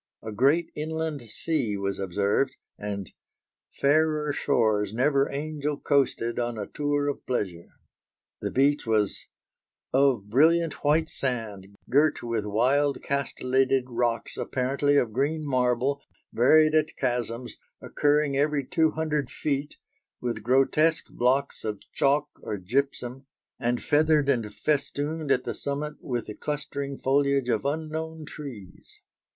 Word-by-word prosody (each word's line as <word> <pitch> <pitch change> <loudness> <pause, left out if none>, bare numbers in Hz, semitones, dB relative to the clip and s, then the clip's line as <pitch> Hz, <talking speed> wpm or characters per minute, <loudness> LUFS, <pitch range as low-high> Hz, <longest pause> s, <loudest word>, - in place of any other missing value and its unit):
A 110 - -5
great 140 +10 +2
inland 160 -1 -3
sea 120 -4 -1
was 100 0 -2
observed, 100 +8 0 0.2
and 100 -2 -5 0.6
"fairer 150 +1 +2
shores 110 -7 +1
never 140 +2 +2
angel 150 0 -3
coasted 130 -5 +1
on 120 -1 -2
a 105 - -3
tour 145 +2 -1
of 145 - -3
pleasure." 95 -9 -2 0.7
The - - -1
beach 140 0 +2
was 105 -3 +1 0.7
"of 130 -6 +3
brilliant 160 +8 +3
white 155 +2 +3
sand, 110 -9 -4
girt 145 +2 +2
with 115 -3 -2
wild 135 +7 +2
castellated 135 -1 +1
rocks 120 -1 -1
apparently 140 +3 +1
of 115 -5 +1
green 150 +5 0
marble, 130 +1 +1 0.3
varied 155 +6 +5
at 155 -1 +1
chasms, 120 0 -2 0.2
occurring 145 -1 +1
every 145 0 +1
two 160 +2 +2
hundred 150 -4 -1
feet, 145 0 -2 0.4
with 120 -3 -3
grotesque 135 +7 +2
blocks 130 +3 +1
of 105 -2 -3
chalk 145 +1 +2
or 105 - -4
gypsum, 130 +5 -2 0.3
and 120 -1 -1
feathered 150 -1 +3
and 115 -6 +1
festooned 150 +3 -1
at 125 -2 +3
the - - -3
summit 145 +2 -3
with 120 -4 -3
the 105 - -7
clustering 140 0 -4
foliage 140 -1 +1
of 110 -1 0
unknown 160 +1 -3
trees." 130 -11 -10
140 Hz, 125 wpm, -26 LUFS, 120-150 Hz, 0.7 s, varied